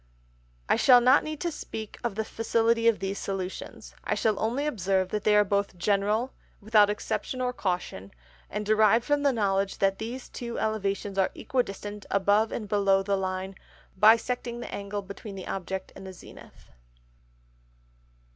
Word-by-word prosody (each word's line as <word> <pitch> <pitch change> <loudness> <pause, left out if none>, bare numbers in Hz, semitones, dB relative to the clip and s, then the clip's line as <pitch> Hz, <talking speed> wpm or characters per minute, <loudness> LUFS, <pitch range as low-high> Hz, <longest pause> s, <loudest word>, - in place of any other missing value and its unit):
_ - - -35 0.6
I - - +3
shall 250 -2 +7
not 255 +4 +5
need 310 -1 -5
to 345 - -1
speak 220 -7 -7
of 235 -5 -2
the 220 +1 -2
Facility 230 +1 +1
of 230 -2 +4
these 195 +1 -4
Solutions, 190 -1 -6
I - - -1
shall 215 -3 +1
only 245 +6 -1
observe 190 - 0
that 210 0 -3
they 210 - +5
are 210 - +6
both 200 -1 -1
General, 210 +6 0 0.3
without 210 -1 +4
Exception 210 +4 -3
or 250 0 -1
Caution, 180 - -3 0.4
and 210 +1 -4
derived 215 +2 +4
from 290 0 +1
the 285 -1 +3
Knowledge 195 -4 0
that 195 0 +1
these 240 +3 -6
two 235 -1 -6
Elevations 200 -2 -2
are 190 - +3
equidistant 205 -4 -3
above 205 +3 +2
and 215 - -4
below 195 -1 +2
the 200 0 0
Line, 190 0 -3 0.4
bisecting 235 +4 +3
the - - -7
Angle 200 0 -4
between 200 +1 -9
the 190 - -7
Object 190 0 -5
and 190 - -10
the 190 - -8
Zenith. 175 - -15
210 Hz, 165 wpm, -27 LUFS, 195-230 Hz, 0.6 s, shall